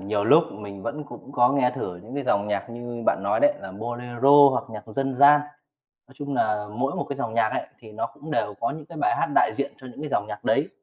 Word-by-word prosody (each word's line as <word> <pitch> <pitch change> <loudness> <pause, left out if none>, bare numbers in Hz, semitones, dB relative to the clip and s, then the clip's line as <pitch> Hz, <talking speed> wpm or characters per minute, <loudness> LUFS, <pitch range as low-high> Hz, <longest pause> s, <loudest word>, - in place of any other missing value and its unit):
nhiều 100 +1 -1
lúc 150 +9 +6
mình 100 -2 -9
vẫn 150 +5 -4
cũng 140 -1 -12
có 120 -2 +4
nghe 135 -3 +2
thử 90 -1 -4
những 110 +9 -11
cái 140 - -3
dòng 100 -4 +1
nhạc 105 +3 -2
như 120 0 -7
bạn - - +2
nói 100 - +1
đấy, 290 0 +4
là - - -8
bolero 120 +6 +4
hoặc 130 - -1
nhạc 105 -2 -8
dân 135 +4 -2
gian. 145 +2 +7 0.7
Nói 135 - -20
chung 145 -1 -5
nà 105 -4 0
mỗi 125 +6 -2
một - - -1
cái 140 - -3
dòng 115 -5 -3
nhạc 115 -1 +3
ấy - - -3
thì 110 -2 -13
nó 105 - -3
cũng 155 +6 -11
đều 105 -7 0
có 115 - 0
những 150 +1 -8
cái 165 0 -11
bài - - +2
hát - - +1
đại - - +4
diện 140 0 -2
cho 130 - -12
những 145 - -11
cái 150 - -4
dòng 105 - 0
nhạc 105 -1 -7
đấy. - - +1
120 Hz, 265 wpm, -25 LUFS, 105-140 Hz, 0.7 s, gian